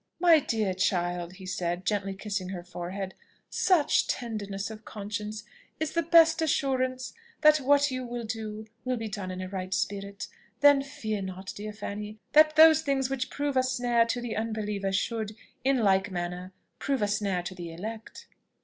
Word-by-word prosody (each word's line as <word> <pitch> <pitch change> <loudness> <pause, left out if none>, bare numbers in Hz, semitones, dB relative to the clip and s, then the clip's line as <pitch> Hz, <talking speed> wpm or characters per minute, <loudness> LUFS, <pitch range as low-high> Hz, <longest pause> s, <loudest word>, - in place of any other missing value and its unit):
"My 335 -2 +7
dear 220 -8 -1
child," 175 -2 0
he 190 0 -11
said; 180 -1 -2
gently 200 -2 -1
kissing 195 -2 -4
her 180 -2 -5
forehead, 180 +2 -5 0.4
"such 335 -6 +3
tenderness 205 -4 -3
of 220 0 -10
conscience 210 0 -5 0.4
is 315 -1 -1
the 335 - +1
best 330 0 +6
assurance 260 -4 0 0.3
that 305 0 +7
what 285 0 +3
you 255 0 -3
will 240 -1 -5
do 220 -1 -5 0.2
will 255 -1 -1
be 225 -1 -4
done 200 -3 -5
in 185 0 -5
a - - -5
right 185 -1 -5
spirit. 200 +1 -3 0.3
Then 285 -1 +7
fear 220 -7 -4
not, 190 0 -6
dear 210 +1 -5
Fanny, 210 0 -6
that 310 0 +6
those 315 0 +8
things 270 -3 0
which 260 -1 -2
prove 285 -1 -2
a 260 - +5
snare 245 -2 +2
to 240 +1 -1
the 240 -2 -4
unbeliever 210 -3 -2
should, 215 +2 -1 0.3
in 270 0 +3
like 195 0 +3
manner, 180 0 -4 0.3
prove 275 -5 0
a - - +2
snare 200 -3 0
to 180 - -5
the 175 -2 -7
elect." 215 +6 -7
215 Hz, 175 wpm, -28 LUFS, 195-260 Hz, 0.4 s, those